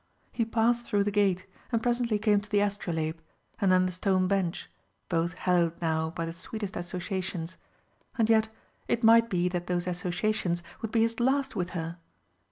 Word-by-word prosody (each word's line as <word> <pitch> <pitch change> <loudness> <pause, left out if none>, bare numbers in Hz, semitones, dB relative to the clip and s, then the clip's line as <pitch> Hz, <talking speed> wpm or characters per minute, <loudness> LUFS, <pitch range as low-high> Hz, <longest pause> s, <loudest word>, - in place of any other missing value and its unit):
He 230 - 0
passed 235 +1 +2
through 205 -3 +2
the 205 - -1
gate, 195 -3 +2 0.3
and 230 -2 0
presently 240 -2 +1
came 210 -1 +3
to 210 - -13
the 210 -1 +3
astrolabe, 170 -6 -2 0.4
and 195 -3 +3
then 185 0 +5
the 185 - -1
stone 185 0 +1
bench, 190 -3 -1 0.4
both 170 0 0
hallowed 175 -2 +1
now 160 -1 0
by 165 0 -4
the 165 - -5
sweetest 205 +3 -6
associations. 180 -1 -4 0.6
And 225 -2 +3
yet 220 -1 +4 0.4
it 235 - 0
might 230 +1 +6
be 180 -3 +1
that 175 -1 -3
those 175 -1 0
associations 180 0 -1 0.2
would 225 - -3
be 225 - +3
his 230 +1 -1
last 265 +2 +1
with 180 -2 -1
her! 165 +1 -5
190 Hz, 175 wpm, -28 LUFS, 175-220 Hz, 0.6 s, might